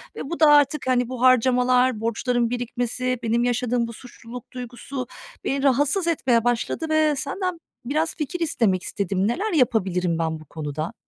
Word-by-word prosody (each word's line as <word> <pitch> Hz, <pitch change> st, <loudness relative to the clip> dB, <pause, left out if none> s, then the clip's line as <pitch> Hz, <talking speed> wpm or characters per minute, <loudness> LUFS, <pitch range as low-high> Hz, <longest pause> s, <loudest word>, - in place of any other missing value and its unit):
ve -, -, -6 dB
bu 340 Hz, -, -4 dB
da 310 Hz, -, +6 dB
artık, 290 Hz, -1 st, +3 dB
hani, 250 Hz, -2 st, +2 dB
bu 255 Hz, -2 st, -6 dB
harcamalar, 255 Hz, -1 st, +4 dB
borçların 235 Hz, +1 st, 0 dB
birikmesi, 245 Hz, +1 st, -2 dB
benim 235 Hz, +1 st, +1 dB
yaşadığım 245 Hz, -1 st, 0 dB
bu 230 Hz, -, -8 dB
suçluluk 245 Hz, 0 st, -11 dB
duygusu 250 Hz, +1 st, -6 dB, 0.4 s
beni 275 Hz, 0 st, -1 dB
rahatsız 290 Hz, +7 st, +2 dB
etmeye 255 Hz, -8 st, +2 dB
başladı 245 Hz, +7 st, -1 dB
ve 310 Hz, -1 st, +3 dB
senden 340 Hz, +5 st, -3 dB, 0.3 s
biraz 310 Hz, +5 st, -1 dB
fikir 335 Hz, +3 st, -4 dB
istemek 225 Hz, -, +1 dB
istedim. 195 Hz, 0 st, -1 dB
Neler 385 Hz, -, -1 dB
yapabilirim 185 Hz, -, +1 dB
ben 160 Hz, -1 st, -1 dB
bu 155 Hz, -, -14 dB
konuda? 155 Hz, +1 st, -5 dB
250 Hz, 155 wpm, -23 LUFS, 230-280 Hz, 0.4 s, da